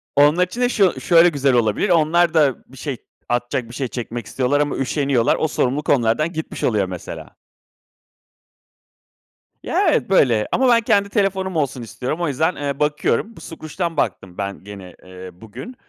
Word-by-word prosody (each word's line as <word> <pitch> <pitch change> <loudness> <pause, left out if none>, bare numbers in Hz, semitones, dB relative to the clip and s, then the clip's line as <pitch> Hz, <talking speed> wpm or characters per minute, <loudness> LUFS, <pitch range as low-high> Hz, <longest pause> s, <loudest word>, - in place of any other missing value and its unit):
Onlar 150 +5 +4
için 235 +7 -6
de 245 - +3
şu 200 -7 +1
şöyle 170 0 +5
güzel 140 -4 +1
olabilir, 120 - +1
onlar 170 0 +3
da 145 -5 +3
bir 135 - -16
şey, 140 -2 -4 0.3
atacak 120 0 -2
bir - - -11
şey 130 -1 -2
çekmek 120 -2 -6
istiyorlar 135 +5 0
ama 145 - -1
üşeniyorlar. 135 -3 +1
O 160 - 0
sorumluluk 145 0 -1
onlardan 140 +6 +2
gitmiş 160 - -6
oluyor 105 -5 +1
mesela. 90 -2 -8 2.3
Ya, - - +1
evet, - - 0
böyle. 115 -5 +3
Ama 260 0 +2
ben 235 -1 +5
kendi 200 -1 +2
telefonum 190 -3 -1
olsun 140 -5 -1
istiyorum. 130 +8 -5
O 170 - 0
yüzden, 160 +6 0
eee, 140 -1 -4
bakıyorum 150 +9 0
bu - - -13
Skroutz'dan 165 +1 -5
baktım 95 -9 -2
ben 100 -1 -5
gene, 95 -3 -11
eee, 95 0 -10
bugün, 110 - -10
145 Hz, 165 wpm, -20 LUFS, 120-170 Hz, 2.3 s, şöyle